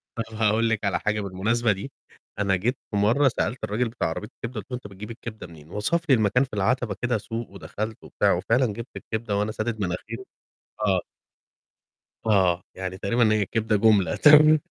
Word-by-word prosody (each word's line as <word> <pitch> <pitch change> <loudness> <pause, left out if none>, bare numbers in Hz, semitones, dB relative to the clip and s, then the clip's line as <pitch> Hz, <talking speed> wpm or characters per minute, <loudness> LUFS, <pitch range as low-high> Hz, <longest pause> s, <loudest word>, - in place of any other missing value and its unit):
طَب 115 - -1
هاقول 110 +1 +2
لِك 110 -2 -1
على 100 - +1
حاجة 105 0 0
بالمناسبة 110 +5 0
دي، 100 +7 -4 0.5
أنا 100 -2 +2
جيت 120 +8 -1
في 105 - -1
مرّة 115 +8 +4
سألت 120 +1 -1
الراجل 110 +3 0
بتاع 115 - -2
عربية 105 +6 -5
الكبدة 115 -1 -5
قُلت 105 - -23
له - - -1
"أنت 120 -4 -8
بتجيب 100 +3 -9
الكبدة 110 -4 -8
منين؟" 80 -2 -15
وَصف 105 - 0
لي 130 - +7
المكان 110 +3 +3
في 130 - -8
العَتَبة 110 +1 0
كده 120 -2 +1
سوق 115 +2 -5
ودخلت 105 +3 -5
وبتاع - - +1
وفعلًا 115 +9 +2
جبت 115 +2 -4
الكبدة 110 -2 -3
وأنا 105 +1 0
سادد 110 0 -3
مناخيري، 110 +7 -4 0.6
آه. 95 -2 +3 1.2
آه، 95 -5 +3
يعني 95 0 -5
تقريبًا 110 +3 +2
هي 105 -2 +2
كدة 110 +1 0
جملة 105 -4 +4
تر 155 +1 +7
110 Hz, 185 wpm, -25 LUFS, 100-115 Hz, 1.2 s, لي